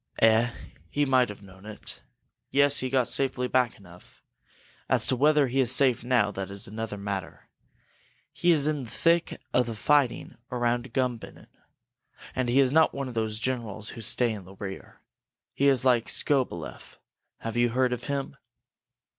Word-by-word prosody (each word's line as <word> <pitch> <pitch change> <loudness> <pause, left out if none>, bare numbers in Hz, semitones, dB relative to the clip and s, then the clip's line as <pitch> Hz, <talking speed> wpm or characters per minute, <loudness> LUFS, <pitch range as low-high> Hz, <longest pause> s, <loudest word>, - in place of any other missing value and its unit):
"Eh 115 +1 +4 0.4
he 145 0 0
might 130 -2 +3
have 105 0 -10
known 95 0 -15
it! 110 0 -10 0.5
Yes, 140 0 +4
he 130 - -2
got 130 -1 +2
back - - -8
safely 130 -2 0 0.3
enough. 90 -3 -18 0.7
As - - +3
to 130 - +3
whether 150 +2 +4
he 130 +2 -1
is 125 -3 +4
safe 130 -5 +2
now, 120 -5 +2
that 95 -1 -5
is 100 0 -5
another 110 0 -5
matter. 100 -1 -6 0.9
He 175 - 0
is 155 -4 +4
in 150 -4 -1
the - - -12
thick 170 +5 +1
of 125 -1 +2
the 115 - -4
fighting 140 +3 +1
around 120 0 -1
Gumbinnen, 125 -2 -4 0.8
and 130 -2 -1
he 125 +3 +3
is 130 -2 +4
not 160 0 +4
one 140 -1 -3
of - - -8
those 110 -1 -1
generals 110 -3 -3
who 115 - -8
stay 120 +2 +1
in 100 -4 -7
the 95 +1 -13
rear. 95 0 -9 0.5
He 140 - +2
is 135 -2 +3
like 120 -3 +3
Skobeleff. 130 - -2 0.4
Have 115 0 -5
you 120 0 +3
heard 125 +1 +1
of 125 - -6
him?" 140 -1 -4
120 Hz, 170 wpm, -27 LUFS, 110-135 Hz, 0.9 s, Eh